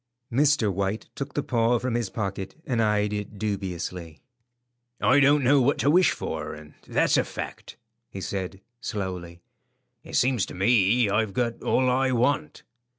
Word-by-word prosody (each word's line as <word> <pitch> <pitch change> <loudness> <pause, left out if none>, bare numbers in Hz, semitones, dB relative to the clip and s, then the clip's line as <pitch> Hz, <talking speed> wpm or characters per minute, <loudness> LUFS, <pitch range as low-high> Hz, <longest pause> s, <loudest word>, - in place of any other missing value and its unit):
Mr. 135 -5 +3
White 100 +3 -2
took 140 +1 -6
the 145 - 0
paw 120 -1 +2
from 125 +1 -2
his 120 -4 -1
pocket 95 -2 -4
and 120 -6 0
eyed 105 -1 +1
it 105 0 -5
dubiously. 90 -5 -4 0.8
"I 135 - +4
don't 145 +1 +4
know 135 +2 +5
what 135 +3 +2
to 145 - +2
wish 180 +2 +5
for, 75 -1 -4
and 75 0 -13
that's - - +2
a - - +3
fact," - - -8 0.3
he 95 - -7
said, 95 0 -4 0.2
slowly. 90 -6 -5 0.6
"It - - -8
seems 125 -5 +2
to - - -9
me 110 +3 +3
I've 105 0 0
got 120 0 -1
all 130 - +2
I 130 +1 +2
want." 125 - 0
110 Hz, 160 wpm, -26 LUFS, 95-125 Hz, 0.8 s, know